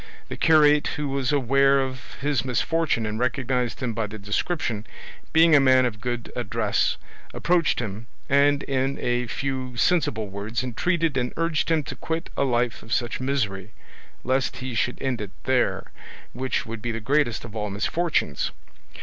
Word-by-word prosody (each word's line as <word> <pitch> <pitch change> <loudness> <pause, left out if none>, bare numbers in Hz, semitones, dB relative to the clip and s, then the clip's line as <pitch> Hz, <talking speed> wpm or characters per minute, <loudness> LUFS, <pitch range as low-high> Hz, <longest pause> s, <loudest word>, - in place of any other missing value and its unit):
The - - -4
curate, 150 -2 +5
who 150 -1 -2
was 135 0 0
aware 135 0 +4
of 130 -2 -4
his 145 -3 +1
misfortune 130 0 0
and 105 +1 -3
recognised 125 -1 -1
him 120 -2 -1
by 110 -1 -2
the 105 +1 -8
description, 110 - -2 0.4
being 165 0 +6
a - - +8
man 130 -1 +5
of 105 -4 -3
good 120 0 -3
address, - - 0 0.4
approached 175 -1 +2
him 110 0 -5 0.2
and 140 +1 +3
in 135 0 -1
a 120 0 0
few 130 -1 -3
sensible 115 - +1
words 100 +5 -3
entreated 160 +4 0
and 125 -1 -1
urged 165 -1 0
him 160 -2 +2
to - - -7
quit 165 +1 -4
a 140 - +1
life 120 -2 0
of 115 - -13
such 120 0 0
misery, 110 -7 -2 0.5
lest 130 +1 0
he 130 -1 -5
should 125 +2 -1
end 125 -4 -2
it 105 - -5
there, 120 -8 0 0.4
which 130 +2 -2
would 115 -1 -6
be 120 - -2
the 115 - -3
greatest 125 0 +1
of 115 -2 -10
all 105 -1 -2
misfortunes. 105 - 0
130 Hz, 165 wpm, -25 LUFS, 115-140 Hz, 0.5 s, a